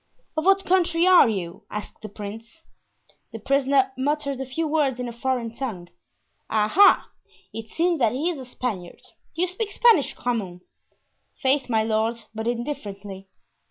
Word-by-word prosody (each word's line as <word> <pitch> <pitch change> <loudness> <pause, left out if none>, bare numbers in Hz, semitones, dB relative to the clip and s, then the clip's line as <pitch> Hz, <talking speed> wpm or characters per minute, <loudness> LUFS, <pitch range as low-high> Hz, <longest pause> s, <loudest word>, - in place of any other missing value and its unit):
"Of 315 +1 -1
what 390 0 +4
country 345 -2 +2
are 365 -9 +7
you?" 175 -5 -5
asked 210 -1 -7
the 215 - -7
prince. 225 +9 -9 0.7
The 225 - -6
prisoner 270 +3 +2
muttered 280 0 -1
a 265 - -5
few 315 +5 -2
words 290 -5 +1
in 250 - -3
a 235 - -6
foreign 235 -1 -2
tongue. 215 -10 -5 0.6
"Ah! 215 -1 +1
ah! 405 +1 +6 0.4
it 225 0 -7
seems 340 +2 0
that 230 -4 +3
he 310 +7 0
is 315 - -6
a 260 - -8
Spaniard. 215 -8 -5 0.3
Do 335 - 0
you - - +2
speak 395 +4 -3
Spanish, 445 - +4
Grammont?" 195 -8 -3 0.8
"Faith, 270 0 +1
my 220 -2 +2
lord, 220 +1 0 0.2
but 220 +1 -4
indifferently." 205 -6 -5
250 Hz, 160 wpm, -24 LUFS, 220-305 Hz, 0.8 s, are